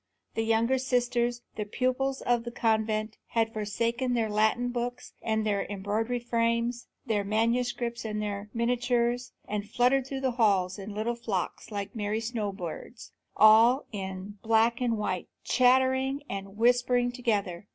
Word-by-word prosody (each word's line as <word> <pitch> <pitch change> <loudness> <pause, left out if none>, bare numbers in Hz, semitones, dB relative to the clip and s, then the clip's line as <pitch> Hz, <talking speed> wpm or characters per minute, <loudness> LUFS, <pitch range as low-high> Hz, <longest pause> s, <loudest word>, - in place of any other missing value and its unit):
The 225 - -1
younger 230 +3 +2
sisters, 245 -1 0
the 210 - -1
pupils 255 +5 -1
of 240 -1 +1
the 240 - -5
convent, 220 -2 0
had 225 -1 0
forsaken 230 +4 -1
their 225 -2 0
Latin 220 +4 +2
books 245 0 -4
and 220 -1 0
their 205 -2 0
embroidery 210 +5 -1
frames, 235 0 0 0.2
their 215 -4 0
manuscripts 235 +3 0
and 215 -1 -3
their 205 0 -4
miniatures, 245 +1 0 0.2
and 205 0 -3
fluttered 250 +3 +2
through 270 -1 -4
the 260 -1 +1
halls 190 -3 +2
in 200 +1 -7
little 220 +3 -1
flocks 225 -6 -3
like 200 -1 -5
merry 210 0 -1
snow 225 -3 -2
birds, 190 +5 -8 0.3
all 225 +5 +6
in 195 0 -6
black 225 +2 +3
and 235 -2 +1
white, 185 -4 -2 0.2
chattering 260 +2 +3
and 195 +1 -6
whispering 245 +1 +3
together. 210 -7 -2
230 Hz, 145 wpm, -28 LUFS, 210-245 Hz, 0.3 s, all